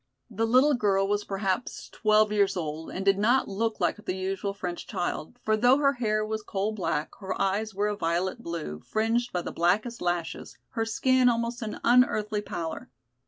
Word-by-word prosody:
The 225 Hz, +2 st, 0 dB
little 260 Hz, +6 st, +5 dB
girl 195 Hz, -5 st, +2 dB
was 205 Hz, +1 st, 0 dB
perhaps 195 Hz, +3 st, -2 dB
twelve 215 Hz, -1 st, +3 dB
years 200 Hz, -2 st, +2 dB
old 160 Hz, -1 st, -4 dB
and 190 Hz, -, -5 dB
did 195 Hz, 0 st, +4 dB
not 240 Hz, +6 st, +3 dB
look 225 Hz, +3 st, -2 dB
like 210 Hz, -, 0 dB
the 185 Hz, -, -2 dB
usual 190 Hz, +1 st, -2 dB
French 180 Hz, -3 st, -5 dB
child, 180 Hz, +1 st, -3 dB
for 215 Hz, -, +2 dB
though 245 Hz, +5 st, +5 dB
her 280 Hz, -1 st, +3 dB
hair 215 Hz, -4 st, 0 dB
was 220 Hz, 0 st, -3 dB
coal 205 Hz, 0 st, -2 dB
black, 165 Hz, -7 st, -2 dB
her 190 Hz, -2 st, -4 dB
eyes 200 Hz, +2 st, 0 dB
were 205 Hz, +1 st, +1 dB
a 210 Hz, -, -1 dB
violet 180 Hz, +4 st, -1 dB
blue, 165 Hz, -, -5 dB
fringed 230 Hz, -, 0 dB
by 180 Hz, -1 st, -2 dB
the -, -, -5 dB
blackest 210 Hz, +8 st, 0 dB
lashes, 175 Hz, -1 st, -3 dB
her 225 Hz, -2 st, -2 dB
skin 255 Hz, +3 st, +3 dB
almost 235 Hz, +1 st, -1 dB
an 215 Hz, -2 st, -5 dB
unearthly 215 Hz, -4 st, +3 dB
pallor. 170 Hz, -5 st, -5 dB
210 Hz, 185 wpm, -27 LUFS, 190-230 Hz, -, little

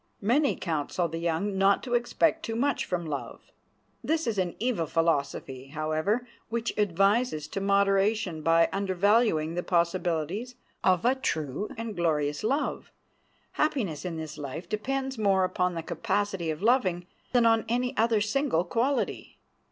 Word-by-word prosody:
Many 260 Hz, +8 st, +2 dB
counsel 165 Hz, +1 st, -1 dB
the 165 Hz, 0 st, -5 dB
young 175 Hz, +4 st, -1 dB
not 195 Hz, +1 st, +4 dB
to 245 Hz, -, -4 dB
expect 280 Hz, +7 st, +2 dB
too 225 Hz, -5 st, -3 dB
much 275 Hz, +5 st, 0 dB
from 175 Hz, -2 st, -2 dB
love. 145 Hz, -3 st, -6 dB, 0.5 s
That 320 Hz, +1 st, 0 dB
is 220 Hz, -4 st, -1 dB
an 180 Hz, -2 st, -1 dB
evil 220 Hz, -9 st, -1 dB
philosophy, 140 Hz, -5 st, -1 dB
however, 155 Hz, -, -1 dB, 0.2 s
which 235 Hz, +1 st, -2 dB
advises 200 Hz, -2 st, +1 dB
to 195 Hz, -, -3 dB
moderation 200 Hz, -2 st, +2 dB
by 165 Hz, +1 st, +4 dB
undervaluing 195 Hz, -3 st, +2 dB
the 175 Hz, -, -1 dB
possibilities 175 Hz, +6 st, -1 dB, 0.3 s
of 185 Hz, 0 st, +3 dB
a 250 Hz, -, +5 dB
true 165 Hz, -, -2 dB
and 230 Hz, -2 st, -5 dB
glorious 150 Hz, -3 st, 0 dB
love. 270 Hz, +7 st, -1 dB, 0.6 s
Happiness 230 Hz, -, -1 dB
in 175 Hz, -3 st, -4 dB
this 155 Hz, -1 st, -6 dB
life 145 Hz, +4 st, -6 dB
depends 265 Hz, +4 st, -2 dB
more 195 Hz, -3 st, +3 dB
upon 180 Hz, -1 st, 0 dB
the 165 Hz, -, -4 dB
capacity 195 Hz, -4 st, -1 dB
of 155 Hz, +4 st, -4 dB
loving 195 Hz, -8 st, +2 dB, 0.3 s
than 245 Hz, -2 st, +4 dB
on 225 Hz, -1 st, +4 dB
any 250 Hz, +2 st, 0 dB
other 225 Hz, -1 st, +2 dB
single 215 Hz, -, +1 dB
quality. 240 Hz, +9 st, -1 dB
195 Hz, 145 wpm, -28 LUFS, 165-230 Hz, 0.6 s, a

